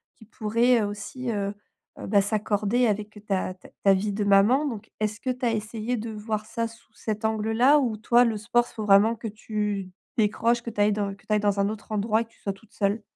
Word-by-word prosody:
qui 220 - -17
pourrait 230 +2 +2
aussi, 210 +5 -5
heu, 200 -1 -2 0.4
bah, 200 0 +2
s'accorder 215 +3 +1
avec 210 0 -1 0.2
ta 190 -2 -1
ta - - -16 0.2
ta 195 -1 +6
vie 200 +2 0
de 210 +1 -1
maman, 205 +9 +5
donc 225 -5 -5
est-ce 215 +1 -1
que 260 - -3
tu 250 0 -3
as 235 - +3
essayé 220 +2 -2
de 225 +1 -5
voir 215 0 -3
ça 230 +1 -2
sous 230 +1 -19
cet 215 0 -4
angle-là, 225 +6 +3
ou 235 -5 -1
toi 235 +3 +4
le 225 -2 0
sport 240 +3 +1
s - - -14
faut 215 -2 -4
vraiment 210 +3 +5
que 225 - -6
tu 210 -2 -3 0.3
décroches, 230 +2 +2
que 235 - -4
tu 210 - -8
ailles 205 0 +4
dans 200 -1 -1
que 200 - -25
tu 215 - -1
ailles 210 - +4
dans 205 -1 +1
un 200 - +2
autre 215 0 -8
endroit 215 +2 +1
et - - -4
que 225 - -29
tu - - -27
sois 200 - -2
toute 200 +2 -21
seule? 205 +2 0
215 Hz, 235 wpm, -26 LUFS, 205-230 Hz, 0.4 s, ta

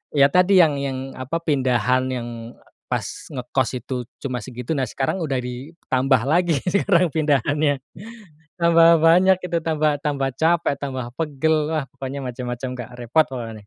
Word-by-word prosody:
ya 140 -1 +6
tadi 180 +2 +4
yang 145 -3 +1
yang 135 -1 -3 0.2
apa 130 +6 -4
pindahan 130 -4 +1
yang 125 -2 -4 0.6
pas - - -4
ngekos 125 -1 -1
itu 130 - -5 0.3
cuma 130 -3 -3
segitu 125 +3 -7
nah 130 - +1
sekarang 135 +7 -2
udah 145 -5 -2
ditambah 130 0 -1
lagi 170 +4 +2
sekarang 180 -2 +2
pindahannya, 145 -2 +1 0.8
tambah 170 0 +6
banyak 180 +3 +5
itu 170 - -1
tambah 155 -2 +1
tambah 140 -2 0
capek 165 -2 +2
tambah 130 -3 -4
pegel 160 0 +1 0.2
wah 150 - 0
pokoknya 135 +1 -6
macam-macam 125 +1 -5
Kak 120 - -6
repot 125 +7 +2
pokoknya. 120 -4 -6
140 Hz, 145 wpm, -22 LUFS, 130-160 Hz, 0.8 s, ya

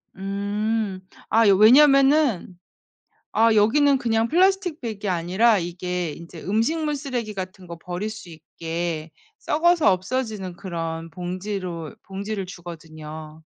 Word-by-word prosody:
음. 200 +1 -2 0.3
아 225 0 +4
왜냐하면은 270 - +5 0.7
아 225 0 +4
여기는 270 +7 +4
그냥 225 -1 +1
플라스틱 365 +1 +2
백이 215 -4 -4
아니라 185 +5 +2
이게 175 -1 -3
인제 170 +1 -11
음식물 295 - 0
쓰레기 250 -6 -4
같은 185 -1 -7
거 170 - -8
버릴 180 +5 -5
수 215 -5 -9
있게 165 0 -5 0.3
썩어서 335 - +3
없어지는 200 -2 -3
그런 165 -2 -5
봉지로 180 -1 -5
봉지를 195 0 -4
주거든요. 155 -3 -9
195 Hz, 265 characters per minute, -23 LUFS, 175-230 Hz, 0.7 s, 왜냐하면은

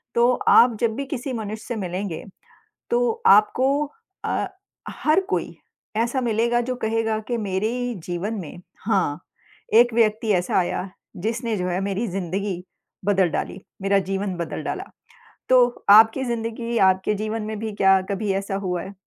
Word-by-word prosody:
तो 240 +1 +5 0.2
आप 235 0 +7
जब 225 -2 +1
भी 275 +2 -3
किसी 265 -1 -4
मनुष्य 220 -1 -5
से 240 - -3
मिलेंगे, 185 -3 -4 0.7
तो 475 -1 +1
आपको 295 - +4 0.4
अ, - - 0 0.4
हर 310 +4 +2
कोई - - -2 0.4
ऐसा 240 +3 0
मिलेगा 235 +1 +1
जो 255 +1 -3
कहेगा 225 -1 -1
कि 240 - -1
मेरे 205 -1 -1 0.4
जीवन 180 +5 -3
में 175 0 -9 0.2
हाँ, 190 -9 +1 0.5
एक 240 +1 +6
व्यक्ति 220 -1 +2
ऐसा 180 -1 0
आया, 180 +2 -2 0.3
जिसने 225 +4 -2
जो 180 -1 -2
है 180 +1 -1
मेरी 200 +4 -2
ज़िंदगी 185 0 -3 0.4
बदल 195 -3 +3
डाली, 185 - -4 0.2
मेरा 195 0 +3
जीवन 195 -1 -2
बदल 170 -2 -4
डाला। - - -3 0.7
तो 245 -1 +4
आपकी 225 +5 +7
ज़िंदगी, 235 0 -3
आपके 190 +1 +3
जीवन 215 +2 -3
में 215 0 -4
भी 220 -1 -3
क्या 195 -1 +4
कभी 200 0 -1
ऐसा 195 0 -2
हुआ 180 -2 -1
है? 195 - -9
215 Hz, 155 wpm, -23 LUFS, 195-235 Hz, 0.7 s, आप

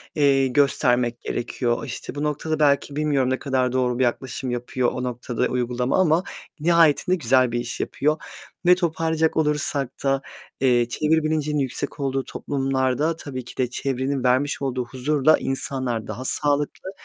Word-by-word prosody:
eee, 135 -2 +4
göstermek 125 -3 +2
gerekiyor. 120 +2 -2
İşte, 130 - -7
bu 145 - -3
noktada 150 +1 -2
belki 140 -1 +2
bilmiyorum, 145 -4 +1
ne 130 - 0
kadar 130 -3 0
doğru 125 -1 0
bir - - +3
yaklaşım 125 +1 -2
yapıyor 125 +1 -1
o 125 - -4
noktada 125 0 -2
uygulama 125 +2 -1
ama 165 +1 +3 0.4
nihayetinde 170 +2 +4
güzel 130 -5 +3
bir 120 - -1
iş 120 0 -5
yapıyor. 155 +2 0 0.5
Ve 180 0 +7
toparlayacak 160 -2 0
olursak 150 -3 0
da, 135 0 +1 0.4
eee, 120 -3 +3
çevre 155 +5 +1
bilincinin 150 -1 0
yüksek 135 +2 -3
olduğu 135 -1 -1
toplumlarda, 135 +3 -1
tabii 130 -6 -7
ki - - -12
de 125 -2 0
çevrenin 135 +1 -2
vermiş 130 +4 +1
olduğu 130 -2 -2
huzurla 140 +4 +2
insanlar 130 -4 -2
daha 115 +5 -6
sağlıklı, 145 +6 -1
135 Hz, 150 wpm, -23 LUFS, 125-150 Hz, 0.5 s, Ve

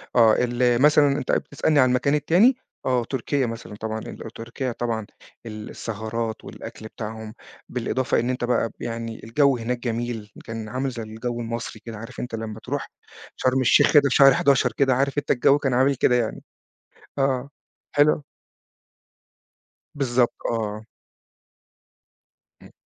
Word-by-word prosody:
آه، 115 -3 +6
ال 120 0 +2
مثلًا 150 0 +6
أنت - - -2
بتسألني 145 +1 +1
على 130 -1 +5
المكان 125 +3 +2
التاني؟ 185 - +4 0.3
آه، 125 -2 +2
تركيا 135 +2 -1
مثلًا 115 -2 -6
طبعًا، 110 +1 -4
ال - - -8 0.2
تركيا 120 +3 -4
طبعًا 115 -2 -3 0.4
السهرات 110 +1 -5
والأكل 110 -1 -9
بتاعهم، 110 0 -7 0.4
بالإضافة 125 +1 0
إن 120 +2 -1
أنت 125 -1 -2
بقى 120 -1 +1
يعني 115 -1 -5
الجو 135 +4 +3
هناك 120 +1 -2
جميل، 115 -3 -3
كان 115 -1 -6
عامل 130 +3 -2
زي 120 -3 -6
الجو 115 +2 -5
المصري 115 -1 -5
كده، 115 -2 -7
عارف 115 +4 -9
أنت 120 -2 -4
لمّا 110 -1 -6
تروح - - -4 0.5
شرم 130 +1 +1
الشيخ 125 - +5
كده 145 -2 +7
في - - 0
شهر 135 -2 +8
11 135 -2 +3
كده، 135 -2 +3
عارف 135 +2 0
أنت 145 - 0
الجو 135 +3 +4
كان 135 -3 -1
عامل 135 +2 +3
كده 125 0 +3
يعني. 120 -3 -1 0.8
آه، 135 0 0 0.5
حلو. 145 0 +4 1.7
بالضبط، 125 -4 +1 0.2
آه. 110 -2 -3 1.8
إمم، - - -15
120 Hz, 145 wpm, -24 LUFS, 115-135 Hz, 1.8 s, شهر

